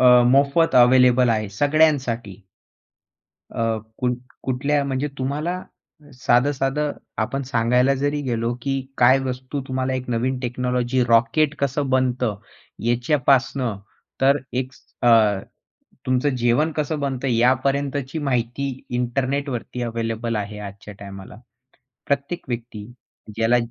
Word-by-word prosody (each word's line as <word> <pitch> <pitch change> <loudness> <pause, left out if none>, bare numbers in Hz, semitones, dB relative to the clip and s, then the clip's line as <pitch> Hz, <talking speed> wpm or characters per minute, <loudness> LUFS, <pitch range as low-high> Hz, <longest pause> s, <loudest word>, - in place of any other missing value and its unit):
अ, - - +4 0.2
मोफत 140 +5 +3
अवेलेबल 125 0 +6
आहे 110 -2 0
सगळ्यांसाठी. 125 - +1 1.1
अ, 115 -1 -1 0.2
कुट् 125 -2 0 0.3
कुठल्या 140 +3 0
म्हणजे 135 +1 -1
तुम्हाला 150 +7 -2 0.5
साधं-साधं 135 +4 +1 0.3
आपण 135 +5 -2
सांगायला 125 +1 +2
जरी 145 +2 -1
गेलो, 120 -2 -1
की 135 +1 -1 0.2
काय 130 +2 +5
वस्तू 130 +1 -4
तुम्हाला 130 0 -1
एक 125 -1 -4
नवीन 125 +2 0
टेक्नॉलॉजी, 125 0 -1
रॉकेट 120 +6 +3
कसं 140 0 -1
बनतं? 125 -4 +1 0.5
याच्यापासनं, 125 -1 +1 0.4
तर 140 +2 +5 0.2
एक 130 +1 -2 0.3
अ, 110 -4 +5 0.7
तुमचं 130 +2 +1
जेवण 125 +6 +2
कसं 150 0 -1
बनतं? 135 -1 -2
यापर्यंतची 135 +4 +1
माहिती 135 0 -1 0.2
इंटरनेटवरती 125 +1 -2
अवेलेबल 115 0 -3
आहे 105 0 -4
आजच्या 100 0 -9
टायमाला. 100 -1 -10 0.7
प्रत्येक 140 +5 -2
व्यक्ती 115 -3 -5 0.5
ज्याला 115 +2 +3
130 Hz, 110 wpm, -22 LUFS, 120-140 Hz, 1.1 s, अवेलेबल